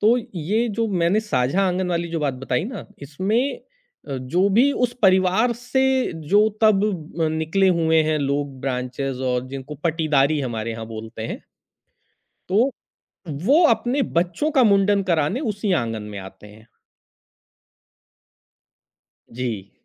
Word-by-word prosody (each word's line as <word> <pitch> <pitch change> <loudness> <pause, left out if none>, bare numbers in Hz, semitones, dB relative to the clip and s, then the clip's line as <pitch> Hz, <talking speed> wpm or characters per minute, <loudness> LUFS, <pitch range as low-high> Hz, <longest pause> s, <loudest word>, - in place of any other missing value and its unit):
तो 225 +3 +4 0.2
ये 220 +9 0
जो 225 +2 -1
मैंने 185 +1 +2
साझा 195 - 0
आँगन 180 0 -1
वाली 170 0 -1
जो 165 -1 -3
बात 140 -3 0
बताई 125 +2 -2
ना, 250 +5 -7 0.2
इसमें 200 - -1 0.5
अ, 135 - -3
जो 175 +10 +1
भी 235 +8 +4
उस 245 -3 0
परिवार 190 +4 +4
से 260 +1 0 0.2
जो 210 +2 +5
तब 215 -3 +5 0.4
ब - - +1
अ, - - +2
निकले 160 +5 +1
हुए 160 -2 +3
हैं 155 0 0
लोग 140 -1 -2
ब्रांचेज़ 130 0 -3
और 125 0 -1
जिनको 135 +2 -7
पटिदारी 155 -3 +2
हमारे 115 -3 -3
यहाँ 110 0 -6
बोलते 110 0 -7
हैं। - - -6 1.1
तो, 225 +8 +3 0.8
वो 305 +7 +5
अपने 245 +4 +1 0.2
बच्चों 180 - 0
का 255 - +6
मुंडन 200 -1 +3
कराने 170 - 0
उसी 205 -1 -2
आँगन 115 -9 -1
में 100 - -5
आते 95 +2 -12
हैं। 110 +2 -16 2.7
जी। 115 -5 -4
170 Hz, 140 wpm, -22 LUFS, 130-210 Hz, 2.7 s, का